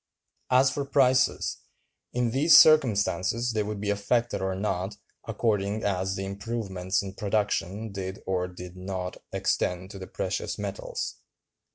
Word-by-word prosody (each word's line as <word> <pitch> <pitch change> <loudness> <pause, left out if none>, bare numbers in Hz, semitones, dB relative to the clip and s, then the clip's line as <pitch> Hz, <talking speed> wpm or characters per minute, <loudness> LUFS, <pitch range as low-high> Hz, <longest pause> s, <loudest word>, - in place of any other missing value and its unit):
As 130 +1 +5
for 140 - -2
prices, 130 -2 +2 0.5
in 120 -1 0
these 145 +5 +7
circumstances 120 -5 +4
they 110 - +1
would 105 0 -4
be 100 0 -1
affected 115 +3 0
or 95 0 -1
not, 95 0 -2 0.3
according 105 -1 0
as 95 -1 0
the 95 - -3
improvements 100 -2 -2
in 95 -1 -6
production 105 0 -1
did 95 -1 -6
or 90 -1 0
did 90 0 -10
not 90 0 -5
extend 90 +2 -1
to 100 - -9
the 95 - -7
precious - - -3
metals. - - -4
100 Hz, 140 wpm, -27 LUFS, 95-115 Hz, 0.5 s, these